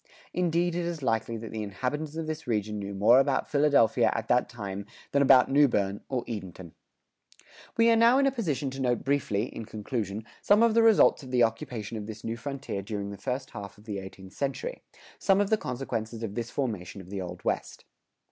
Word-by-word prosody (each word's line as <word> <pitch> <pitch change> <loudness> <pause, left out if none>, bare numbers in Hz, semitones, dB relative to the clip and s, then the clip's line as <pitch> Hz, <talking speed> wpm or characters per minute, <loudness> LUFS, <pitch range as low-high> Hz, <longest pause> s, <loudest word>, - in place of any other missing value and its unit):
"Indeed 175 0 +1
it 175 +1 -1
is 165 -4 -4
likely 115 -1 0
that 110 0 -7
the 110 - -4
inhabitants 130 +10 -3
of 165 0 -3
this 155 -2 -5
region 105 -2 -1
knew 100 0 -5
more 110 +6 +6
about 135 0 +1
Philadelphia 140 -6 +4
at - - -3
that 125 0 +3
time 100 -3 -6 0.2
than 140 - +3
about 135 -1 +6
Newbern 105 -9 +3
or 130 -3 -1
Edenton."[106:3] 95 -6 -11 0.3
We 230 0 +5
are - - +5
now 230 +3 +6
in 275 - +4
a 275 - +3
position 155 - -2
to 135 +1 -6
note 125 -2 +1
briefly, 135 -7 0
in 115 - -5
conclusion, 105 -1 -4 0.2
some 210 +3 +5
of 230 -1 +4
the 230 - +5
results 225 -7 +5
of 130 - -10
the 125 -1 +3
occupation 115 -1 -2
of 105 -1 -6
this 110 -1 -8
new 115 - -3
frontier 130 -3 -5
during 100 0 -4
the - - -6
first 130 +6 -4
half 100 -3 -8
of 105 - -17
the 105 -3 -4
eighteenth 95 0 -11
century 145 - -3 0.4
some 195 0 +3
of 205 0 +1
the - - +6
consequences 115 - -4
of 105 -3 -4
this 120 +1 -3
formation 105 -10 -3
of 95 0 -12
the 100 -1 -3
Old 90 -1 -7
West. - - -2
120 Hz, 205 wpm, -28 LUFS, 105-145 Hz, 0.4 s, more